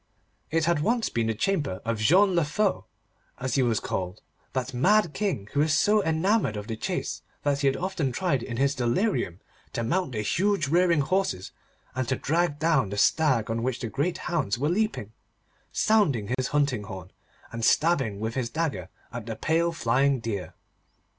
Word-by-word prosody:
It 160 0 +1
had 170 -2 +2
once 230 +8 +1
been 115 -1 -1
the 115 - 0
chamber 145 - -1
of 115 -1 -1
Jean 185 - +4
le 170 - +3
Fou, 190 +7 0 0.5
as 130 0 -2
he 135 - +3
was 115 -4 +2
called, 90 -1 -4 0.3
that 130 0 -2
mad 180 +6 +3
King 190 - -2
who 145 - +1
was 155 0 +3
so 210 +6 +4
enamoured 160 - +1
of 105 - -5
the 115 0 -4
chase, - - -3 0.2
that 140 -1 +1
he 140 - +2
had 135 - +2
often 175 -7 -1
tried 140 -2 0
in 120 -1 -5
his 140 +2 +2
delirium 120 - 0 0.3
to 115 - -2
mount 170 +4 -1
the 105 -2 -2
huge 185 - +1
rearing 170 0 +3
horses, 185 - -1 0.4
and 130 -1 -2
to 130 - +2
drag 165 +1 0
down 155 -9 +2
the 105 - -5
stag 130 -3 +2
on 115 0 -1
which 125 0 -1
the 115 - -4
great 145 +9 -1
hounds 150 - 0
were 145 +4 0
leaping, 180 - -1 0.6
sounding 140 - +2
his 130 0 -1
hunting 140 -7 0
horn, 95 -3 -8 0.4
and 115 0 -5
stabbing 135 -8 +2
with 110 +1 -3
his 125 -2 -2
dagger 140 - -2 0.2
at - - -6
the - - -3
pale 165 +2 +1
flying 135 -2 +2
deer. 100 -7 -4
140 Hz, 185 wpm, -26 LUFS, 115-170 Hz, 0.6 s, Jean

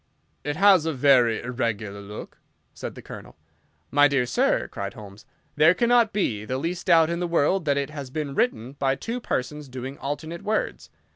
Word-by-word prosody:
"It 145 +1 -2
has 190 -3 +5
a 160 - 0
very 125 -4 +4
irregular 115 -5 -3
look," 105 +1 -10 0.3
said - - -7
the - - -11
Colonel. - - -11 0.5
"My 145 +1 +6
dear 135 -3 +1
sir," 120 - +1
cried 100 0 -6
Holmes, 105 -1 -12 0.3
"there 155 +4 +5
cannot 235 -1 +3
be 110 - -1
the 130 +4 -3
least 170 +7 -4
doubt 165 -2 +5
in 170 - -2
the 175 - -1
world 170 +2 +1
that 140 -1 +2
it 140 +1 -2
has 140 -4 -7
been 145 0 -4
written 130 - 0
by 135 -1 0
two 230 - -4
persons 150 - -3
doing 130 +2 -7
alternate 155 +4 -5
words. 215 +1 -2
140 Hz, 185 wpm, -25 LUFS, 125-170 Hz, 0.5 s, My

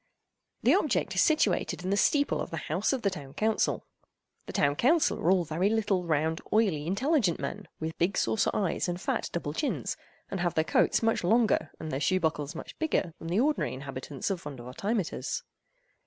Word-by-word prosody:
This - - +5
object - - +1
is - - +3
situated 225 - +2
in 185 - -1
the - - +3
steeple 285 +7 +2
of - - -4
the 165 - -4
House 170 +6 -1
of 265 -3 -2
the 200 - +2
Town 145 -6 -8
Council. 220 0 +1 0.6
The - - -5
Town 145 0 +2
Council 305 - +3
are 165 - +1
all 185 -1 +4
very 165 +6 +1
little, 210 -5 +1
round, 160 0 0
oily, 190 -9 +2
intelligent 210 - +1
men, - - -5
with 160 +1 -4
big 175 +4 +1
saucer 220 - +2
eyes 185 -4 0
and 175 0 -3
fat - - -1
double 150 -4 -3
chins, 285 - -2 0.3
and 195 - -2
have 175 -1 0
their 160 - +3
coats 160 - +2
much 225 -4 +2
longer 220 +5 +3
and 155 -1 -5
their 135 - -1
shoe 185 +6 +2
buckles 150 -3 -1
much - - -9
bigger 250 - 0
than 165 - -7
the 175 +5 +1
ordinary 290 - +1
inhabitants 135 +3 -5
of 185 -3 -3
Vondervotteimittiss. 145 - -3
180 Hz, 190 wpm, -29 LUFS, 155-215 Hz, 0.6 s, This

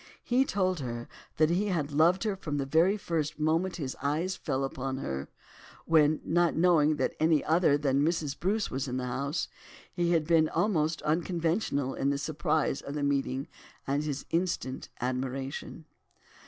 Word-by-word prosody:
He 255 +2 +2
told 185 -6 0
her 120 -3 -5 0.3
that 155 +1 +4
he 195 +4 +1
had 160 -7 -1
loved 165 +7 +3
her 210 -3 0
from 150 -6 -4
the 140 - -1
very 165 +8 +3
first 160 -6 -2
moment 165 +4 +1
that 165 - -4
his 130 - -4
eyes 160 +7 0
fell 135 +1 -2
upon 135 0 -3
her, 70 - -4 0.6
when, 155 -1 +4
not 175 0 +2
knowing 160 -3 +4
that - - -1
any 155 -2 +3
other 160 -2 +3
than 140 -1 +1
Mrs. 155 -3 0
Bruce 205 +4 0
was 135 +1 -2
in 125 0 -2
the 130 - -2
house 140 +5 -2 0.5
he 175 -1 0
had 160 -2 +2
been 160 -1 +4
almost 160 -7 0
unconventional 165 -3 0
in 140 - 0
the 140 - +1
surprise 150 0 0
of 140 - -6
the 145 - -2
meeting 135 -1 0 0.4
and 140 +2 0
his 145 -2 -4
instant 165 -7 -2
admiration. 135 +5 -4
155 Hz, 170 wpm, -29 LUFS, 140-170 Hz, 0.6 s, that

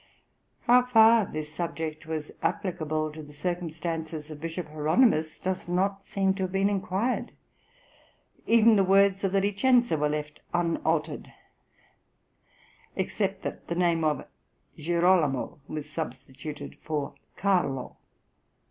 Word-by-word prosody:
How 245 +1 +6
far 225 -3 +5
this 155 0 -6
subject 160 -1 -4
was 155 -2 -4
applicable 155 -4 -1
to 155 +1 -9
the 150 -1 -12
circumstances 160 -1 -4
of 150 -1 -9
Bishop 165 +1 -4
Hieronymus 155 - +2
does 185 -1 -3
not 195 +3 0
seem 195 -1 +1
to 195 - -6
have 185 - -6
been 195 +1 +2
inquired; 205 +4 -1 1.1
even 230 -1 +6
the 195 - +5
words 195 +1 +4
of 195 - +1
the 195 - +3
Licenza 210 - +3
were 150 0 +2
left 150 0 -4 0.2
unaltered, 165 -2 -1 1.6
except - - -2
that - - -6
the 170 - -2
name 170 -2 +2
of 150 -1 0 0.5
Girolamo 170 -4 +1
was 150 -1 -5
substituted 145 -1 -7
for 150 -2 -3 0.2
Carlo. 175 -10 0
170 Hz, 120 wpm, -27 LUFS, 155-195 Hz, 1.6 s, How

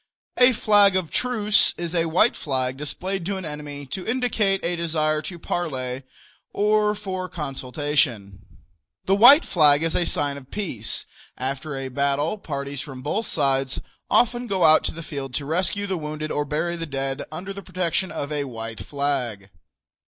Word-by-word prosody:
A 250 +1 +6
"flag 205 -3 +4
of 185 -4 -1
truce" 215 -4 +2
is 170 -1 -4
a 165 -1 +1
white 180 +8 +3
flag 130 -3 -1
displayed 180 +6 -4
to 200 -1 -1
an 190 - -6
enemy 150 -1 -6
to 180 +8 -5
indicate 225 -6 +1
a 175 +1 0
desire 155 -2 0
to 175 +2 -7
parley 130 -7 -3 0.5
or 210 0 +2
for 185 -3 -4
consultation. 135 - -1 0.7
The 190 - +3
white 260 +10 +8
flag 150 -3 +4
is 165 - 0
a 175 - +2
sign 145 -1 0
of 135 -1 -12
peace. 145 - -2 0.3
After 140 +3 -3
a 135 0 -3
battle 140 +8 0
parties 140 -4 -4
from 130 -3 -9
both 210 +9 -1
sides 135 -2 0 0.3
often 240 +1 +2
go 190 -4 0
out 155 0 +6
to - - 0
the 165 - -8
field 135 -4 -5
to 140 - -2
rescue 185 +6 0
the 190 -3 -2
wounded 155 0 -4
or 145 - 0
bury 160 +4 -1
dead 135 -4 -3
under 185 +5 -6
the 200 - -7
protection 185 0 -2
of 140 +1 -4
a 145 -1 -1
white 115 -3 -5
flag. 120 -5 -2
155 Hz, 165 wpm, -24 LUFS, 140-190 Hz, 0.7 s, white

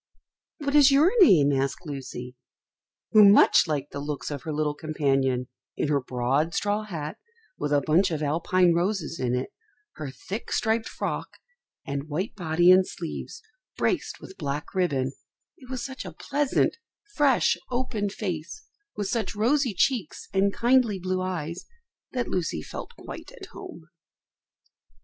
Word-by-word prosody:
"What 285 -3 -3
is 290 -2 +7
your 290 +6 +5
name?" 145 - +6
asked 135 +5 -1
Lucy, 130 -3 -7 0.8
who 215 -1 +8
much 200 -2 +7
liked 145 -2 -2
the 140 - -5
looks 145 +1 -4
of 145 -2 -4
her 160 - -5
little 150 0 0
companion 135 -5 0 0.3
in 150 - 0
her 145 -2 +2
broad 130 +6 0
straw 205 +1 0
hat, 155 -7 -5 0.4
with 150 - -2
a 145 -1 +4
bunch 170 +6 +3
of 155 -2 -2
Alpine 170 +4 +2
roses 175 -1 -1
in 125 -1 0
it, 125 +1 -3 0.5
her 150 -3 -5
thick 190 - -7
striped 225 0 0
frock, - - -4 0.5
and 140 +2 -4
white 180 +9 -2
body 175 -2 +3
and 185 0 +6
sleeves, 170 - -7 0.3
braced - - -1
with 385 - -12
black 145 +1 -4
ribbon; 140 -9 0 0.5
it 255 - -16
was 255 -2 -4
such 265 0 -6
a - - -7
pleasant, 285 +8 0 0.4
fresh, 285 -6 +3
open 240 -5 -1
face, 190 - -5 0.3
with 205 - -2
such 220 -2 -2
rosy 245 +1 +2
cheeks 230 - 0
and 195 +1 +3
kindly 240 -2 +3
blue 185 0 -2
eyes, 175 -2 -4 0.4
that 250 -2 -2
Lucy 165 - -2
felt - - -8
quite - - -9
at - - -10
home. - - -10
175 Hz, 150 wpm, -26 LUFS, 145-220 Hz, 0.8 s, who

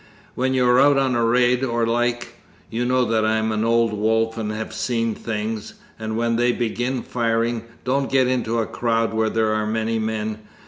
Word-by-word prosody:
When 130 +1 0
you 125 -1 +3
are 125 +1 +5
out 140 +1 +5
on 135 -2 +2
a 120 -1 +1
raid 125 +2 +3
or 120 -2 0
the 115 - 0
like 120 0 0 0.4
(you 120 +2 -1
know 130 +1 +2 0.2
I'm 110 0 +1
an 110 0 0
old 115 -1 +2
wolf 110 +2 +1
and 110 -2 -3
have 110 0 -5
seen 115 0 -1
things), 110 0 -4 0.2
and 110 0 -3
when 115 0 +1
they 120 +1 +3
begin 120 +2 -2
firing, 115 -1 -1 0.2
don't 135 +2 0
get 130 -1 +3
into 120 -2 0
a 115 - +1
crowd 115 -1 -1
where 110 0 +1
there 110 -1 +1
are 110 0 -1
many 110 +1 -1
men. 110 -1 -3
115 Hz, 195 wpm, -22 LUFS, 110-120 Hz, 0.4 s, are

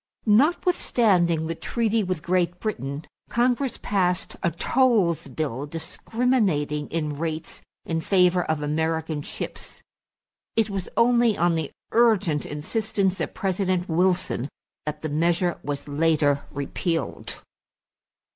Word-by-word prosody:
Notwithstanding 215 - +3
the 165 - -2
treaty 225 +4 0
with 185 -4 -3
Great 180 0 +1
Britain, 145 -8 -4 0.2
Congress 245 +3 +1
passed 180 -2 0
a 170 - +2
tolls 195 - +2
bill 140 -1 -3
discriminating 165 - 0
in 150 -3 -3
rates 160 0 -4 0.2
in 165 -1 -1
favor 180 -1 +3
of 155 -2 -1
American 160 0 -1
ships. - - -6 0.7
It 220 -2 +2
was 195 -2 -4
only 235 -2 +4
on 175 +1 +3
the 160 -3 -1 0.2
urgent 210 -10 +3
insistence 195 +5 -1
of - - -3
President 185 -1 0
Wilson 175 -6 +1 0.4
that 150 0 -4
the 155 - -2
measure 170 +3 +1
was 145 0 -4
later 145 -1 +2
repealed. 165 +4 -3
175 Hz, 115 wpm, -25 LUFS, 155-205 Hz, 0.7 s, only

